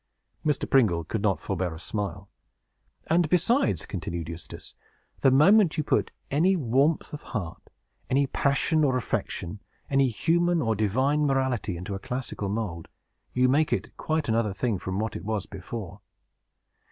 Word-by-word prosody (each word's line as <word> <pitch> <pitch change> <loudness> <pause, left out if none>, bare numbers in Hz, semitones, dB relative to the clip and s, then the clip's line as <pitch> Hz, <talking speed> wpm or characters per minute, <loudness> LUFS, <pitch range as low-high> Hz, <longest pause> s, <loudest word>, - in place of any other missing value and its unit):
Mr. 150 -2 0
Pringle 105 -12 +3
could 100 +6 -3
not 100 -3 +1
forbear 90 -3 -2
a - - -9
smile. 100 -1 -4 0.8
"And 165 -1 +2
besides," 180 - +2
continued 85 -1 -5
Eustace, 85 0 -9 0.5
"the 135 - +5
moment 170 +7 +5
you 155 - +1
put - - +1 0.2
any 175 +7 +3
warmth 140 +2 +1
of 150 - -5 0.2
heart, 85 -6 -7 0.4
any 140 +2 +3
passion 140 +4 +1
or 130 -3 +3
affection, 100 -4 -3 0.3
any 135 -1 +4
human 170 +8 +2
or 115 -6 +1
divine 130 +9 +2
morality, 130 -8 0
into 90 +3 -5
a 95 - -4
classic 125 +4 -5
mould, 100 -5 -3 0.5
you 125 0 +3
make 150 +4 +2
it 105 +5 -2
quite 155 -1 -1
another 110 -3 +1
thing 105 0 -1
from 95 +1 -4
what 110 +1 -2
it - - -6
was 105 -2 -2
before. 100 0 -7
120 Hz, 155 wpm, -27 LUFS, 100-145 Hz, 0.8 s, the